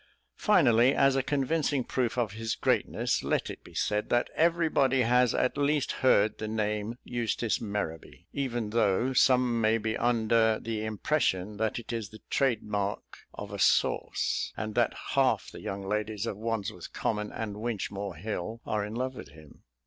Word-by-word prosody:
Finally, 120 +3 +4
as 135 -1 +4
a 135 - +3
convincing 140 0 0
proof 125 -1 -1
of 115 -5 0
his 110 +2 -3
greatness, - - 0
let - - 0
it - - -11
be - - -15
said 105 0 0
that 120 0 +1
everybody 160 -6 +3
has 125 0 +3
at 130 +3 0
least 145 0 +1
heard 110 -5 +3
the 110 - -3
name 105 +1 -2
"Eustace 120 -2 -1
Merrowby" 100 -7 -5
even 120 -6 -2
though 115 +3 +2
some 125 -2 +3
may 110 +1 +3
be 110 0 -2
under 115 -2 +2
the 110 -1 -3
impression 105 -3 -1
that 110 0 -1
it 120 0 -6
is 110 -4 -3
the 110 - -13
trade 130 -6 +1
mark 100 -1 -3 0.2
of - - -7
a - - -5
sauce; - - +1
and 110 -1 -4
that - - +1 0.2
half - - +2
the - - -10
young 100 0 -5
ladies 105 +1 -2
of 115 - -3
Wandsworth 105 -4 -4
Common 105 -1 -2
and 105 -2 -5
Winchmore 100 -4 -4
Hill 110 +4 -4
are 105 -1 -1
in 105 +2 -6
love 130 +2 -2
with 75 - -10
him. 75 0 -16
110 Hz, 170 wpm, -29 LUFS, 105-125 Hz, 0.2 s, Finally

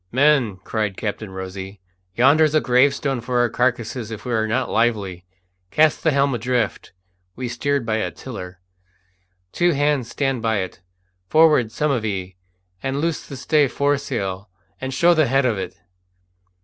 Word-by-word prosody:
"Men," 130 -6 +3
cried 105 -3 -2
Captain 105 -1 -4
Rosy, 95 +1 -7 0.4
"yonder's 150 +6 +4
a - - +6
gravestone 135 0 +2
for 125 +1 -2
our 120 0 +3
carcases 120 -1 -1
if 110 -2 -8
we 125 - -2
are 110 -1 +1
not 125 +3 0
lively! 100 -6 -1 0.4
Cast 155 +5 +3
the 160 - +4
helm 140 -2 +2
adrift!" 120 -2 -1 0.4
(we 130 0 -4
steered 140 +2 -1
by 110 0 0
a 100 -5 -1
tiller). 90 -1 -9 0.9
"Two 175 0 +2
hands 145 -4 +1
stand 135 -1 -1
by 110 -2 +1
it. 95 -2 -5 0.5
Forward, 155 -8 +4
some 150 +4 0
of 125 -5 0
ye, 95 -4 -3 0.5
and 135 +1 -2
loose 165 0 -1
the 140 - -8
stay 145 +3 +3
foresail, 120 -9 -2 0.3
and 130 0 -4
show 170 +7 +4
the 155 -4 +3
head 135 +2 +2
of 110 -5 +1
it." 95 -2 -5
125 Hz, 160 wpm, -21 LUFS, 105-140 Hz, 0.9 s, a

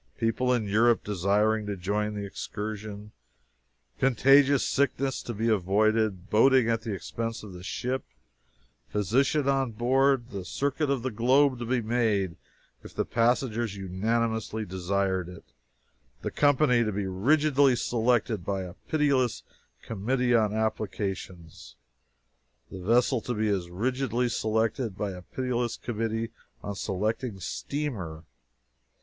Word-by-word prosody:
People 120 +3 +1
in 120 -4 +1
Europe 115 +3 +3
desiring 105 +2 +1
to 100 -1 -3
join 105 +3 -1
the 100 -1 -4
excursion 105 +1 -6 0.9
contagious 135 +2 +4
sickness 135 -1 0
to - - -6
be 115 +1 -2
avoided 105 -1 +1
boating 130 +2 +5
at 115 0 0
the 110 -1 -5
expense 115 +4 -4
of 100 -3 -9
the 90 - -9
ship 125 +8 -3 0.9
physician 135 - +1
on 135 -2 +2
board 130 +2 +2
the 100 -2 -5
circuit 140 - -1
of 135 -4 0
the 130 - -2
globe 130 +4 +3
to 120 - -4
be 125 -1 0
made 110 -6 0 0.5
if - - -12
the - - 0
passengers 115 -2 +1
unanimously 110 +3 -1
desired 95 0 -1
it 90 - -11 0.8
the - - -2
company 145 -4 +3
to 110 - -1
be 100 0 -2
rigidly 135 +7 +3
selected 120 -4 +1
by 95 +1 -2
a 90 -1 -8
pitiless 140 -6 +1 0.4
"Committee 120 +4 0
on 110 -3 +3
Applications" 100 -6 -4 1.0
the 95 - -7
vessel 120 +5 +2
to 120 - -3
be 110 0 0
as 95 -4 -1
rigidly 125 +5 -1
selected 110 -1 -1
by 100 -2 -2
as 90 -1 -9
pitiless 125 -2 -1
a - - -36
"Committee 115 -1 -2 0.3
on 105 - -4
Selecting 105 +3 -2
Steamer." 95 - -4
110 Hz, 130 wpm, -27 LUFS, 100-125 Hz, 1.0 s, boating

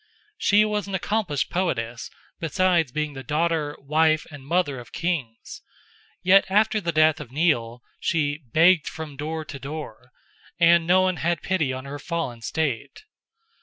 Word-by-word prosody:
She 210 +1 +4
was 210 -2 -2
an 195 - -3
accomplished 190 -7 -1
poetess, 120 -11 -2 0.3
besides 170 -2 +1
being 150 +1 -2
the 135 - -7
daughter, 155 0 -1
wife, 155 +2 +2
and 145 -2 -10
mother 145 -3 0
of 120 - -12
king's, 145 -10 -4 0.6
yet 195 +2 +6
after 215 +2 +2
the 170 -2 -1
death 155 -1 +3
of 140 -5 -9
Nial 125 -6 0 0.2
she 145 -3 0
"begged 170 +2 +5
from 160 -4 -7
door 155 +2 -4
to 140 - -8
door," 135 -4 -8 0.5
and 170 0 +5
no 185 +1 +5
one 185 -2 +1
had 170 0 -1
pity 165 -8 0
on 130 +1 -6
her 145 +1 -7
fallen 150 -7 -4
state. 140 - -3
155 Hz, 155 wpm, -24 LUFS, 140-175 Hz, 0.6 s, yet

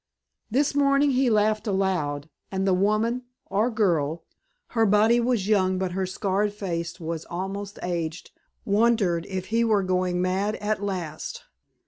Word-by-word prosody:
This 275 +6 +1
morning 280 0 +3
he 260 -1 +2
laughed 215 0 +2
aloud, 180 -7 0 0.2
and 190 0 -1
the 190 - +3
woman 215 +6 +1 0.3
or 210 +5 +2
girl? 170 - 0 0.5
her 225 -2 +2
body 215 +4 +4
was 235 -5 0
young 185 -3 +2
but 185 -1 -1
her 190 +1 -1
scarred 200 +2 0
face 170 -4 -4
was 165 -1 -4
almost 195 +3 -5
aged 170 -2 -3 0.3
wondered 200 -5 +2
if 185 -1 -4
he 230 +1 +3
were 215 -3 +2
going 185 -1 0
mad 190 +4 0
at 210 0 -2
last. 185 -6 -4
195 Hz, 145 wpm, -25 LUFS, 180-215 Hz, 0.5 s, body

